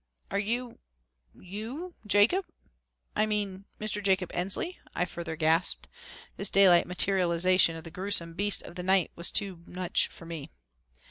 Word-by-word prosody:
"Are 200 - 0
you 235 +3 -3 0.5
you 225 - -7
Jacob 215 - +4 0.7
I 215 +1 +2
mean 200 -2 -2
Mr. 215 -1 -2
Jacob 190 -2 +1
Ensley?" 195 - -1 0.2
I 180 - +1
further 170 -2 -6
gasped. 160 +3 +2 0.5
This 200 - +1
daylight 185 -3 +6
materialization 180 -2 +3
of 165 - -8
the 165 - -9
grewsome 185 -3 -1
beast 205 +3 +1
of - - -10
the 180 - -6
night 190 -1 +2
was 170 - 0
too 195 -5 0
much 180 0 0
for 165 - -10
me. 165 -4 -6
190 Hz, 145 wpm, -29 LUFS, 175-205 Hz, 0.7 s, daylight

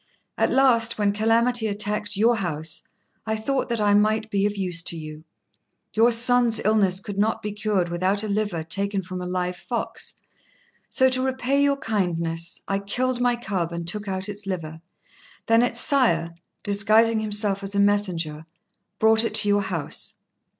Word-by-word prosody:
At - - +1
last, 235 -4 +3
when 205 -1 +1
calamity 225 +2 +2
attacked 210 0 -2
your 230 +3 +3
house, 160 -4 -3 0.5
I 220 - 0
thought 260 +5 -2
that 235 -1 -1
I 205 -1 +2
might 215 +1 +1
be 200 0 +1
of 205 0 -5
use 180 -3 -1
to 170 0 -3
you. 155 0 -9 0.7
Your 225 +2 +4
son's 240 0 +4
illness 200 -4 +2
could 200 0 -7
not 220 +2 0
be 210 - -3
cured 205 -4 -1
without 185 +4 0
a - - -3
liver 205 -5 -2
taken 195 +4 -1
from 185 0 -7
a 180 - -5
live 180 0 -3
fox, - - -4 0.7
so 260 - +4
to 255 0 -1
repay 265 +1 0
your 280 0 +2
kindness 170 -8 -2
I 195 0 -1
killed 245 +5 -1
my 245 -1 +2
cub 195 -8 -3
and 170 0 -6
took 210 +3 -3
out 190 -1 0
its 205 -1 -5
liver; 160 -4 -5 0.6
then 230 0 +4
its 240 -1 0
sire, 170 - +2 0.3
disguising 215 +3 +3
himself 205 -2 +1
as 200 0 -4
a - - +1
messenger, 180 -7 0 0.5
brought 220 0 +4
it 230 - -2
to 215 -1 +5
your 205 0 +3
house." 180 -6 +1
205 Hz, 170 wpm, -23 LUFS, 185-225 Hz, 0.7 s, to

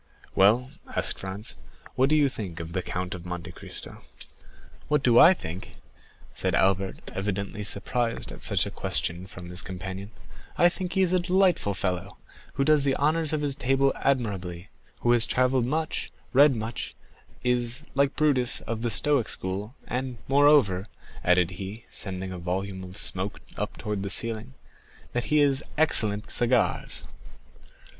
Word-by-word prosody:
"Well," 115 +7 +4 0.2
asked - - -1
Franz, 95 -7 -5 0.4
"what 130 +2 +2
think 130 - +1
you - - -3
of 85 - -10
the 90 - 0
Count 90 0 -3
of 90 -2 -7
Monte 90 -1 -6
Cristo?" - - -7 0.9
"What 150 -2 +1
do 120 -1 +6
I 185 +3 +8
think?" 85 - -7 0.6
said 95 -2 0
Albert, 95 +1 0
evidently 100 +1 -3
surprised 115 +4 0
at - - -10
such - - +3
a - - -5
question 90 +2 -1
from 95 -3 -10
his 90 +1 0
companion; 95 +2 -6 0.5
"I 175 - +6
think 180 0 -4
he 190 0 +3
is 185 -1 +2
a 185 - +4
delightful 180 - +2
fellow, 90 -3 -3 0.4
who 135 - 0
does 150 0 +4
the 135 -1 +2
honors 155 +2 +2
of 155 -1 -1
his 145 -2 +2
table 135 +1 +2
admirably; 100 -8 -2 0.3
who 120 - +3
has 120 -1 +4
travelled 125 -1 +2
much, 155 +3 -2 0.2
read 140 +1 +6
much, 110 +1 -5 0.5
is, 125 0 0
like 140 0 +2
Brutus, 140 -5 +3
of 115 -1 -4
the 120 - 0
Stoic 140 +1 +2
school, 100 +6 -2
and 125 0 -3
moreover," 135 -9 +4 0.4
added 90 -1 +3
he, 100 +5 -7
sending 95 -2 -4
a 90 - -6
volume 95 +2 -3
of 90 +1 -10
smoke 95 +2 -2 0.2
up - - -4
towards 105 -2 -3
the 100 - -3
ceiling, 110 - -1 0.6
"that 120 0 -1
he 150 - +2
has 140 -1 +3 0.2
excellent 105 -9 +3
cigars." 120 -1 +1
115 Hz, 155 wpm, -26 LUFS, 95-135 Hz, 0.9 s, I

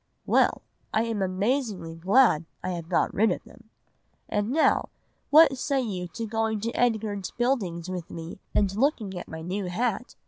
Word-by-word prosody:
"'Well, - - +3 0.3
I 220 - +2
am 225 -3 -2
amazingly 195 -1 -1
glad 180 0 +4 0.2
I 185 - -2
have 170 -2 -5
got 180 - +1
rid 215 0 +3
of - - -3
them! 230 -1 -18 0.6
And 210 +1 -1
now, 310 +5 +2 0.4
what 300 -2 +7
say 275 0 0
you 190 -8 -3
to 200 +7 -5
going 220 0 -1
to 230 +2 -2
Edgar's 215 -5 0
Buildings 200 -9 -1
with 180 -2 -5
me 165 +2 -8 0.2
and 195 -2 +2
looking 220 -6 0
at 180 - -6
my 160 0 -7
new 190 +3 -3
hat? 230 +6 -2
205 Hz, 170 wpm, -26 LUFS, 180-235 Hz, 0.6 s, what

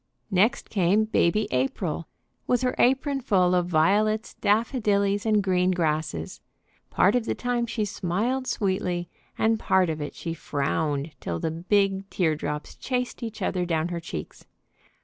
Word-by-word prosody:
Next 195 +5 +2
came 200 +2 +3
Baby 215 0 +2
April 150 +6 -1 0.4
with 250 0 +2
her 250 - +1
apron 270 +2 +2
full 185 -7 +3
of 180 -1 +2
violets, 205 +7 +2
daffodillies, 205 -2 +1
and 210 -2 +3
green 185 -1 +2
grasses. 155 - -1 0.5
Part 195 - +3
of 245 -2 +1
the - - -1
time 245 -1 -1
she 225 -2 -1
smiled 220 +8 -1
sweetly, 180 -4 -1 0.3
and 225 0 +2
part 185 -5 +2
of 155 -1 -5
it 145 - -5
she 165 - -4
frowned 145 -1 -2
till 85 -1 -3
the 160 - -1
big 195 +3 +1
tear 160 -4 +1
drops 150 0 -5
chased 250 -1 -3
each 225 -2 -5
other 180 -2 0
down 165 -1 0
her 175 -1 -3
cheeks. 80 - -8
190 Hz, 150 wpm, -26 LUFS, 165-220 Hz, 0.5 s, came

